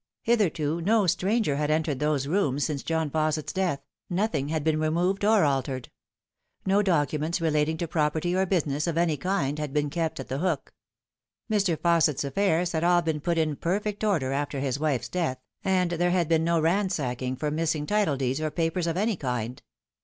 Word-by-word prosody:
Hitherto 170 -8 +1
no 210 +3 +3
stranger 190 -3 +1
had 150 0 0
entered 155 -3 0
those 150 -2 0
rooms 145 -4 +1
since 145 -3 -2
John 160 -2 -1
Fausset's 155 0 -1
death, 180 -7 0 0.3
nothing 175 -7 -1
had 155 -1 -1
been 155 0 +1
removed 175 +6 0
or 215 -2 +4
altered. 135 -3 -1 0.7
No 195 +2 +3
documents 160 -3 0
relating 160 -1 +1
to 170 - -3
property 155 +3 0
or 190 0 +1
business 155 -4 0
of 165 -1 -1
any 170 -2 +2
kind 150 -2 -1
had 150 -2 -4
been 145 -1 0
kept 165 -2 -2
at 135 - -6
The 135 - -3
Hook. 170 -5 -2 0.8
Mr. 195 -6 +2
Fausset's 165 -4 +2
affairs 175 +4 +1
had 160 0 -1
all 175 0 +4
been 160 -2 -1
put 170 +2 0
in 155 -2 +1
perfect 205 +7 -2
order 165 -11 +1
after 140 0 -2
his 135 0 -1
wife's 135 -6 0
death, 145 -2 -1 0.3
and 185 -2 +1
there 175 +1 +1
had 175 -2 +1
been 160 0 +2
no 170 0 +2
ransacking 155 -8 0
for 150 +3 -2
missing 155 -1 -1
title 205 -7 +1
deeds 135 +2 -1
or 155 - 0
papers 165 +2 -1
of 165 +1 -1
any 215 +2 +1
kind. 125 -4 -3
160 Hz, 185 wpm, -26 LUFS, 145-180 Hz, 0.8 s, or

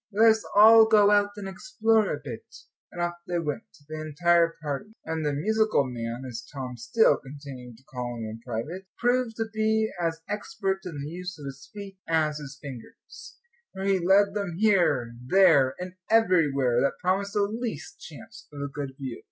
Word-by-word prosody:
"Let 220 +2 +6
us 220 0 -1
all 220 +2 +9
go 210 -2 +5
out 205 0 +4
and 200 -2 -6
explore 220 - +1
a - - -3
bit," - - -8 0.5
and 175 - -9
off 175 0 -2
they 175 - -1
went, 150 -4 -2 0.3
the 155 0 -6
entire 165 +2 +2
party. 150 +9 -4
And 160 0 -3
the 150 - 0
"musical 215 +4 +2
man," 120 -1 -5
as 120 -1 -7
Tom 130 -3 -6
still 120 - +3
continued 135 -4 -10
to 130 - -23
call 125 -2 -5
him 115 - -5
in 110 +1 -6
private, 130 +11 -5
proved 245 -1 +1
to 225 - -1
be 220 0 +1
as 165 -1 -1
expert 205 -1 -2
in 155 -5 -6
the - - -5
use 180 +3 -6
of 145 - -10
his 140 0 -9
feet 200 -2 -9
as 155 -2 +1
his 145 -1 -9
fingers, 130 -5 -11 0.4
for 190 - -6
he 195 -1 +2
led 195 +3 +4
them 200 -5 -3
here, 175 - +2
there, 145 -4 +5
and 180 0 -6 0.2
everywhere 150 - +3
that 140 - 0
promised 195 +2 0
the 205 - +2
least 215 -6 -5
chance 225 +8 -12
of 145 - -9
a 140 0 -4
good 140 -2 -5
view. 130 -4 -6
170 Hz, 185 wpm, -26 LUFS, 140-205 Hz, 0.5 s, all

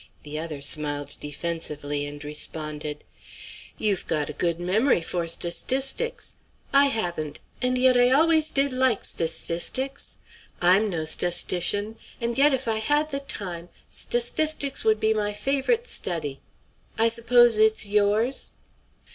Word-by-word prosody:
The 150 +1 -6
other 155 -3 -5
smiled 145 0 0
defensively, 145 -2 -4
and 145 0 -9
responded: 150 0 -3 0.7
"You've 205 -4 -1
got 150 -2 -2
a - - -10
good 170 -1 -2
memory 190 +5 +1
for 170 0 -3
sta 170 +1 +1
stistics. 270 - +1 0.4
I 280 0 +5
haven't; 175 - -3 0.2
and 250 0 +1
yet 255 0 +4
I 245 0 +4
always 315 +3 +3
did 275 -1 +2
like 255 -4 +1
sta 165 - 0
stistics. 260 - 0 0.4
I'm 190 +4 +3
no 165 -4 -3
sta 175 +3 +1
stitian, 205 +5 +1 0.2
and 235 0 -3
yet 285 +2 +4
if 265 -2 -2
I 220 -1 0
had 295 +6 0
the 275 - -1
time 180 -10 -5 0.2
sta - - +1
stistics 280 +3 +2
would 220 -1 +2
be 220 0 +2
my 210 -1 -2
favorite 275 - -1
study; 155 - -2 0.6
I 225 - +3
s'pose 235 0 +4
it's 220 0 +3
yours." 210 +5 +1
210 Hz, 145 wpm, -24 LUFS, 165-260 Hz, 0.7 s, I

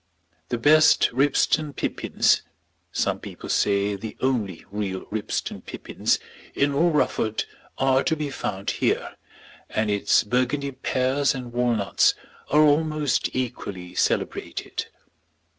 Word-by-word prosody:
The 120 - -1
best 155 +6 +5
Ribston 145 +3 +2
pippins, - - +1 0.5
some - - 0
people - - -9
say 100 0 +2
the 110 +2 -7
only 115 -9 -1
real 100 -2 -3
Ribston 110 0 -3
pippins, - - -1 0.4
in 140 0 +2
all 165 +5 +3
Rufford 115 -8 0 0.3
are 135 0 +3
to 160 - +2
be 150 -2 -3
found 100 -6 -3
here, - - -1 0.5
and 110 -1 0
its 100 +3 +3
Burgundy 130 +5 0
pears 130 +2 0
and 125 -2 -7
walnuts 120 -5 +2 0.3
are 150 +2 +5
almost 155 -1 +2
equally 100 -8 -4
celebrated. - - -2
125 Hz, 115 wpm, -24 LUFS, 105-145 Hz, 0.5 s, best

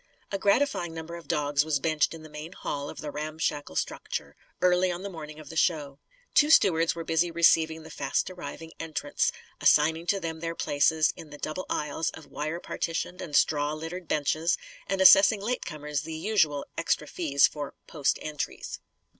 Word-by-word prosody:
A 195 - -2
gratifying 200 -5 +1
number 165 +1 -6
of 170 -4 -10
dogs 145 -1 +1
was 155 -3 0
benched 155 +1 +1
in 160 - -11
the - - -10
main 150 +3 -8
hall 145 -5 -4
of - - -8
the 150 -1 -5
ramshackle 150 - -3
structure; - - -3 0.2
early 180 0 +3
on 175 +2 -5
the 200 - -5
morning 155 -3 -8
of 155 - -11
the 160 - -9
show. 150 -4 +1 0.3
Two 295 - +5
stewards 170 - +5
were 165 - -4
busy 165 +1 +1
receiving 160 -1 +3
the 160 - -11
fast 135 - -1
arriving 165 -2 -8
entrants, 155 -2 -1 0.3
assigning 160 +3 +4
to 200 - +2
them 160 -2 -4
their 165 0 -3
places 155 +2 +2
in 160 - -11
the 145 - -10
double 155 +5 -4
aisles 150 +2 -1
of 160 - -11
wire 155 +3 -3
partitioned 175 +1 -3
and 150 - -5
straw 145 0 +3
littered 165 +3 -6
"benches," 155 +3 +1 0.3
and 195 -1 0
assessing 195 +3 +8
late 240 +5 -2
comers 150 -1 -3
the 160 +1 -6
usual 160 -5 +1
extra 165 -2 0
fees 145 -3 +3
for 145 -1 -4
"post 145 -4 0
entries." 150 -1 -5
160 Hz, 180 wpm, -28 LUFS, 150-170 Hz, 0.3 s, assessing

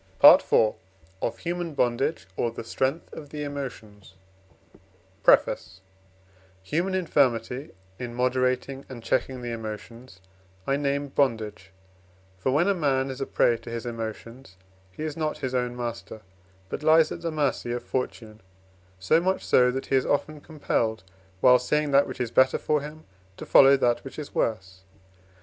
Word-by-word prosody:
PART - - +9
IV: 110 - +3 0.5
Of - - -2
Human 170 -2 -3
Bondage, 125 +5 0
or 120 - 0
the 115 - -8
Strength 135 +7 -2
of 150 -3 -9
the 150 0 -5
Emotions 110 -9 -8 1.1
PREFACE 95 0 +2 0.8
Human 175 - -1
infirmity 130 -6 0 0.3
in 120 -1 -6
moderating 130 +2 0
and 120 -3 -9
checking 130 +1 -1
the 120 - -4
emotions 115 0 -8 0.5
I 135 - +1
name 140 0 -1
bondage: 110 -8 -1 0.7
for, 130 - 0
when 155 +7 +2
a 200 - +3
man 135 -6 0
is 130 +1 -8
a 135 - -2
prey 120 - +2
to 120 - -11
his 115 +1 -5
emotions, 115 -1 -7 0.3
he 120 - -7
is 155 -2 -4
not 155 -2 -2
his 130 -2 -4
own 125 -1 -1
master, 115 -2 -6 0.5
but 140 - -5
lies 155 +1 +5
at - - -6
the 165 - -2
mercy 145 -6 -1
of 120 0 -3
fortune: 110 -4 -5 0.6
so 95 - +3
much 190 +2 -1
so, 125 0 +4
that 130 +2 -3
he - - 0
is 130 - +2
often 150 +1 -1
compelled, 115 - -2 0.4
while 125 0 +7
seeing 150 +4 0
that 140 +1 +4
which 130 - -8
is 120 -2 -2
better 130 +1 +4
for 150 -1 0
him, 150 +2 -9 0.3
to - - -8
follow 135 0 +7
that 120 -2 +1
which 135 - -10
is 150 -2 -7
worse. 95 -4 -2
130 Hz, 160 wpm, -26 LUFS, 115-145 Hz, 1.1 s, PART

